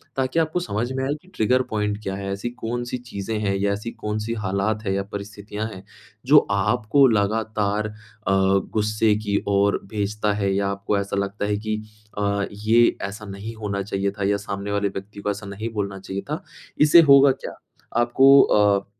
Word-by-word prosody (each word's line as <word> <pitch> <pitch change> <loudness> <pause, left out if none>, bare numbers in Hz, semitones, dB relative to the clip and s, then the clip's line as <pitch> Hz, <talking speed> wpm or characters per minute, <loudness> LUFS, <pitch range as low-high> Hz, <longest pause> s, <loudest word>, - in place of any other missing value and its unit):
ताकि 135 +4 0
आपको 160 +2 0
समझ 120 - -2
में 130 0 -2
आए 140 - 0
कि - - -24
ट्रिगर 125 +4 +2
पॉइंट 105 -1 -1
क्या 95 - -3
है? 100 0 -4
ऐसी 100 +5 -3
कौन-सी 120 +1 -4
चीज़ें 110 -3 -5
हैं 100 -2 0
या 100 +1 0
ऐसी 105 +3 -5
कौन-सी 105 +2 -3
हालात 100 +3 -1
हैं 95 - 0
या 100 0 -1
परिस्थितियाँ 105 +1 -6
हैं, 95 +1 -10 0.4
जो 150 +4 +7
आपको 110 +7 +3
लगातार 105 -1 0
अ, 105 - -9 0.4
गुस्से 105 +3 +2
की 100 0 +1
ओर 100 0 +2
भेजता 105 0 -1
है? 100 -2 0
या 100 0 +1
आपको 100 +1 -1
ऐसा 100 0 -3
लगता 100 +1 -2
है 105 0 0
कि 110 0 -2 0.4
अ, 100 -1 0
ये 110 +3 +3
ऐसा 105 +2 -8
नहीं 100 +3 -7
होना 100 -2 -3
चाहिए 100 0 -2
था - - -1
या 100 - +2
सामने 100 +1 -4
वाले 100 0 +1
व्यक्ति 100 +1 -8
को 105 - 0
ऐसा 100 +1 -7
नहीं 105 +3 -5
बोलना 100 -2 -3
चाहिए 95 +1 -5
था। 155 - -3 0.4
इससे 155 +3 +8
होगा 140 0 +8
क्या? 130 - -6 0.5
आपको 135 +3 +6
अ, 100 -1 +3
105 Hz, 185 wpm, -23 LUFS, 100-115 Hz, 0.5 s, इससे